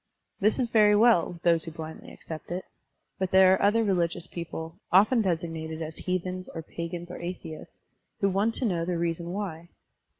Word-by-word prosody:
This 215 +1 +3
is 245 -3 0
very 210 -2 +6
well 220 -6 +4
with 170 - -14
those 165 -2 +4
who - - -5
blindly 160 0 -8
accept 160 -1 -9
it. 180 +2 -4 0.5
But 190 -1 0
there 190 0 +7
are - - +1
other 220 +3 +4
religious 175 -4 0
people, 165 -1 -7
often 215 +6 +5
designated 165 -4 -2
as 160 -1 -5
heathens 185 0 -3
or 165 - -6
pagans 170 +2 -6
or - - -7
atheists, 170 -3 -7 0.4
who 200 - +3
want 205 +4 +1
to 260 - -1
know 175 -6 0
the 175 0 -1
reason 170 0 -2
why. 175 -4 -5
175 Hz, 180 wpm, -27 LUFS, 165-195 Hz, 0.5 s, there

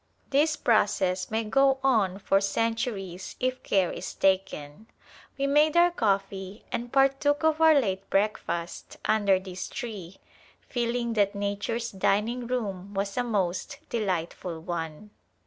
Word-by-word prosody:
This 300 +3 +3
process 195 -7 +1
may 220 +1 0
go 270 +4 +3
on 215 -8 +2
for 195 0 +2
centuries 200 -3 -2
If 255 0 -1
care 190 -3 +1
Is - - -6
taken. 190 -2 0 0.5
We 275 - 0
made 300 +3 +3
our 350 +1 +6
coffee 195 - -1
and 240 +1 -3
partook 275 +2 +2
of 315 0 +2
our 320 -2 +7
late 195 -5 -2
breakfast 195 -4 -2
under 200 -3 +3
this 185 -1 -7
tree, 195 -6 -7 0.5
feeling 235 -1 -1
that 205 -2 +2
nature's 205 +4 -2
dining 215 +5 0
room 200 -5 -3
was 195 0 -2
a 245 - +1
most 200 +1 -1
delightful 180 -5 -2
one. 165 +3 -5
210 Hz, 130 wpm, -27 LUFS, 190-245 Hz, 0.5 s, our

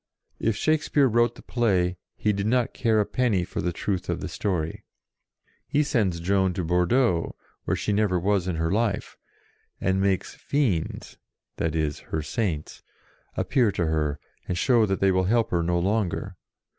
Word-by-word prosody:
If 115 -1 +1
Shakespeare 150 0 +2
wrote 120 0 +2
the - - -14
play, 95 -7 +1 0.2
he 105 - +1
did 100 +1 -2
not 125 +1 +1
care 115 -3 +2
a 105 - +2
penny 115 -8 +1
for - - -4
the 90 - -1
truth 95 +2 -3
of - - -1
the - - -4
story. 85 -6 -2 0.8
He 150 +1 +2
sends 105 - 0
Joan 95 +1 +1
to 90 - -2
Bordeaux, 90 +3 +2 0.3
where - - +1
she 105 - -1
never 100 -3 +2
was 95 0 +1
in 90 - -1
her 80 +1 -1
life, 105 -1 -1 0.6
and 95 +1 +1
makes 95 -2 0
"Fiends" 120 - -2 0.4
(that 80 -1 -1
is, 75 -2 -1
her 80 -1 -2
Saints) 85 -4 -3 0.6
appear 120 -6 +2
to 85 - 0
her, 75 -2 0 0.3
and 90 - -2
show 115 -2 +3
that 95 0 -1
they 95 0 +4
will 95 0 +2
help 115 +3 +2
her 85 - +2
no 85 +1 +1
longer. 95 0 -1
95 Hz, 170 wpm, -25 LUFS, 85-115 Hz, 0.8 s, they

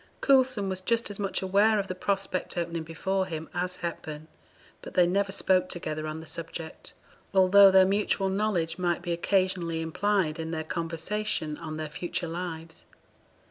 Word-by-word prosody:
Coulson 260 -7 +3
was 190 -1 -3
just 230 +3 0
as 205 - -5
much 195 -1 -1
aware 205 +3 +4
of 200 -1 -1
the 185 - -3
prospect 190 -1 -2
opening 170 -1 -2
before 185 +4 -2
him 160 -2 -5
as 180 +1 -2
Hepburn; 155 -2 -6 0.5
but - - -10
they 180 - +6
never 195 +2 +1
spoke 185 -2 +2
together 155 -3 -4
on 155 +1 -5
the - - -11
subject, 165 0 -6 0.4
although 195 +1 +8
their 190 0 +7
mutual 200 0 +1
knowledge 190 -4 0
might 175 -1 0
be 175 - -3
occasionally 175 -1 0
implied 165 0 0
in 160 0 -3
their 160 -1 -3
conversation 165 +1 -2
on 155 -2 -6
their 155 - -3
future 170 +2 -3
lives. 165 -1 -6
180 Hz, 165 wpm, -28 LUFS, 165-195 Hz, 0.5 s, although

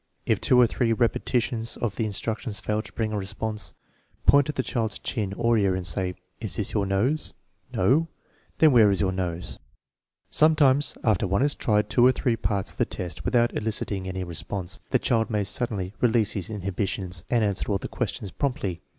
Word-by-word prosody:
If - - +1
two 125 - +4
or 125 - +8
three 115 0 +1
repetitions 115 0 0
of 110 -5 -2
the 110 - -1
instruction 110 +3 -2
fail 105 +2 -1
to - - -12
bring 110 -2 -2
a 105 - -1
response, 105 +2 -4 0.5
point 140 0 +6
to - - 0
the 130 - -2
child's 110 -4 -2
chin 105 -4 -3
or 115 +1 +2
ear 95 -2 +2
and 95 -1 -4
say: 90 +2 -1
" 95 - -43
Is 110 - +1
this 105 - -1
your 100 -2 0
nose? 115 +11 +2
" - - -45
" - - -29
No? 135 - +3 0.2
" - - -36
" - - -38
Then 155 -2 +6
where 115 -5 +6
is 100 - +1
your 95 -2 +1
nose? 90 -2 -4 0.4
" - - -66 0.3
Sometimes, 150 -3 +4
after 105 -4 +2
one 100 +7 +1
has 145 0 +2
tried 105 -2 +1
two 120 - +3
or 130 - +7
three 125 -2 0
parts 100 -4 -2
of - - -17
the - - +2
test 90 -4 -6
without 120 -1 +2
eliciting 105 -3 -2
any 95 0 -3
response, 90 +1 -3
the - - +3
child 115 -2 0
may 105 -2 0
suddenly 100 -2 -2
release 115 -3 +3
his 95 -5 -4
inhibitions 95 -3 -3
and 120 -3 +2
answer 100 +1 -1
all 100 - +2
the - - -6
questions 100 - -4
promptly. 100 - -2
105 Hz, 210 wpm, -25 LUFS, 95-120 Hz, 0.5 s, or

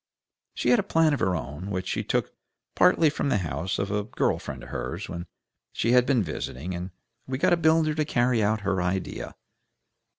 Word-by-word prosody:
She - - 0
had 245 - +5
a 205 - -3
plan 160 -2 +4
of 145 - -1
her 95 - +1
own, 75 +6 -5
which 95 -1 -3
she - - -1
took - - -1 0.4
partly 180 -3 +5
from 145 - -1
the - - +3
house 80 +3 -2
of 100 +1 -2
a 105 0 0
girl - - 0
friend - - -7
of - - -10
hers 75 - -4
where 85 0 -6 0.5
she 115 - +1
had 125 0 +5
been 125 -6 +3
visiting, 80 0 -5
and 90 +1 -5 0.4
we 130 0 -2
got 140 - +3
a - - +7
builder 160 -1 +3
to 155 0 0
carry 120 -5 +1
out 105 +1 +1
her 100 -2 0
idea. 90 +1 -3
105 Hz, 205 wpm, -26 LUFS, 90-145 Hz, 0.5 s, a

